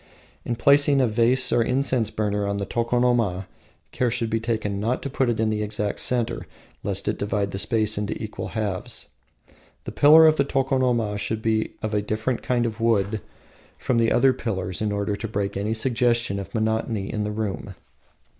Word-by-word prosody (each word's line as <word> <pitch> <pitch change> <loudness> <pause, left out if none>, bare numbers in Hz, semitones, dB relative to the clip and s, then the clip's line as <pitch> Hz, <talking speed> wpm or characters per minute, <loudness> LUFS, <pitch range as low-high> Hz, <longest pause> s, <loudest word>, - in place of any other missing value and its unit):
In 120 - -2
placing 140 +3 +4
a 130 - +4
vase 120 +3 +3
of 120 - +3
an - - 0
incense 125 -4 +1
burner 105 -2 -1
on 100 0 -1
the 100 - -2
tokonoma, 120 -5 0 0.5
care 125 - 0
should 115 -1 -2
be 115 - +1
taken 110 -3 -2
not 115 +5 -1
to 140 - -4
put 130 -2 +1
it 115 - -1
in 110 -1 +1
the 105 0 -1
exact 105 -1 -2
centre, 120 -2 0 0.3
lest - - -3
it - - -1
divide 100 -1 -1
the 95 - -4
space 110 -1 +2
into 105 -1 -3
equal 110 -1 -5
halves. 100 -4 -3 0.7
The - - -6
pillar 155 +3 +7
of 155 0 +5
the 140 - +3
tokonoma 130 -6 0
should 110 +1 -3
be 110 -1 0
of 110 0 -2
a 105 - +1
different 110 +4 -2
kind 120 -1 0
of 115 0 -4
wood 110 -2 +1 0.6
from 120 -2 0
the 115 -1 +2
other 130 +2 +4
pillars, 95 -7 -4
in 105 -1 0
order 100 0 -1
to 110 +3 -5
break 100 -2 -3
any 105 +3 -1
suggestion 115 -3 +1
of 95 +2 -8
monotony 110 -2 -1
in 105 - -1
the 105 - -2
room. 105 -2 -4
110 Hz, 190 wpm, -24 LUFS, 105-120 Hz, 0.7 s, pillar